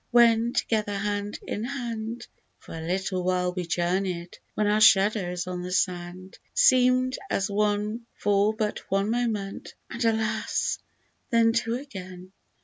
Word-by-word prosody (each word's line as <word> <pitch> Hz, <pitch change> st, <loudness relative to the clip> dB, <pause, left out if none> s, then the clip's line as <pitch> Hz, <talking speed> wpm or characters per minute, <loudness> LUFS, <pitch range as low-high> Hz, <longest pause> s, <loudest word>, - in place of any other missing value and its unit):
when 235 Hz, -1 st, +5 dB
together 210 Hz, -4 st, 0 dB
hand 205 Hz, +1 st, -2 dB
in 210 Hz, -, -3 dB
hand, 235 Hz, -3 st, -4 dB, 0.3 s
For -, -, -12 dB
a 165 Hz, -, -6 dB
little 185 Hz, +2 st, -2 dB
while 180 Hz, 0 st, 0 dB
we 180 Hz, -2 st, -4 dB
joumey'd, 175 Hz, +1 st, -1 dB
— -, -, -43 dB
when 215 Hz, -, +1 dB
our 210 Hz, +1 st, +2 dB
shadows 195 Hz, -4 st, +4 dB
on 180 Hz, -1 st, -4 dB
the 180 Hz, 0 st, -5 dB
sand 180 Hz, 0 st, -2 dB, 0.2 s
Seem'd 255 Hz, 0 st, +4 dB
as 195 Hz, +1 st, 0 dB
one 210 Hz, +3 st, 0 dB
for 205 Hz, +1 st, +2 dB
but 215 Hz, -1 st, -1 dB
one 195 Hz, +2 st, +1 dB
moment, 225 Hz, -5 st, -2 dB, 0.2 s
and 235 Hz, +1 st, -3 dB
alas! 220 Hz, -1 st, 0 dB, 0.5 s
then 230 Hz, -3 st, +4 dB
two 230 Hz, 0 st, 0 dB
again. 185 Hz, -8 st, -8 dB
205 Hz, 140 wpm, -26 LUFS, 185-230 Hz, 0.5 s, when